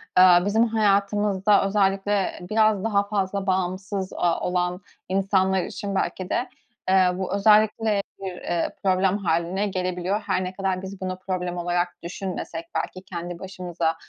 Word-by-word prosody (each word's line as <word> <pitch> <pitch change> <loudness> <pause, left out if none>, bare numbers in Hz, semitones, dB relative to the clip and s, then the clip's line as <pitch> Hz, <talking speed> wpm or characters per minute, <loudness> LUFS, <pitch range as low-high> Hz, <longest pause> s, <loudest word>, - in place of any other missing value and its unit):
aaa, 180 0 +7
bizim 220 +3 +3
hayatımızda 205 -2 +2
özellikle 195 0 +1
biraz 215 -2 +3
daha 205 -3 +2
fazla 200 -1 -1
bağımsız, 190 +1 -1
aaa, 170 -1 +1
olan 180 0 -1 0.3
insanlar 190 -1 +2
için 200 -1 -5
belki 185 -1 -2
de, 245 - -1 0.4
eee, 190 -1 +5
bu 190 0 -3
özellikle 210 0 +4 0.2
bir, 190 -1 -4
eee, 170 -1 -1
problem 190 +1 +2
hâline 180 +2 0
gelebiliyor. 185 +2 -2
Her 190 -2 0
ne 185 +1 -4
kadar 190 -1 -1
biz 190 0 -8
bunu 185 0 -3
problem 180 -2 -3
olarak 175 0 0
düşünmesek, 170 -2 -5
belki, 185 - -3
kendi 175 -2 -6
başımıza, 175 -3 -2
190 Hz, 140 wpm, -24 LUFS, 180-200 Hz, 0.4 s, aaa